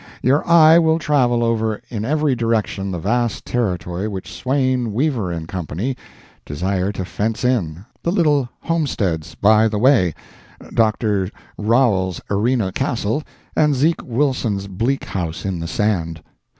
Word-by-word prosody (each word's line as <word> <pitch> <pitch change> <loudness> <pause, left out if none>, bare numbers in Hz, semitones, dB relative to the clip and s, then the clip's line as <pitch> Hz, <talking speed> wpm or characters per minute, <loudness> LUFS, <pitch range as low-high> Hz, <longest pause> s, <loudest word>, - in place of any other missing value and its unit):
Your 135 +4 +3
eye 165 -1 +7
will 160 -1 +3
travel 130 -7 +2
over 110 -2 0
in 110 -3 -4
every 150 -1 +1
direction 110 -4 -1
the 90 - -3
vast 115 +6 -1
territory 90 -4 -2
which 95 -3 -6
Swain, 130 -3 0
Weaver 115 - -1
& - - -16
Co. 90 -1 -4 0.8
desire 95 +5 -1
to 95 - -4
fence 110 +6 -2
in, 95 -8 -1 0.2
the 170 - 0
little 150 -8 +2
homesteads 110 - -1
by 110 +2 +4
the 110 -1 -2
way, 110 - +3 0.6
Dr. 105 -4 +1 0.3
Rowell's 105 -5 +1
arena 105 0 +1
castle, 115 +6 -1 0.3
and 150 -2 +3
Zeke 155 +6 +1
Wilson's 120 -6 -1
Bleak 115 +8 -1
House 85 -3 -4
in 95 -3 -2
the 85 - -4
sand. 85 -6 -1
110 Hz, 135 wpm, -20 LUFS, 95-130 Hz, 0.8 s, eye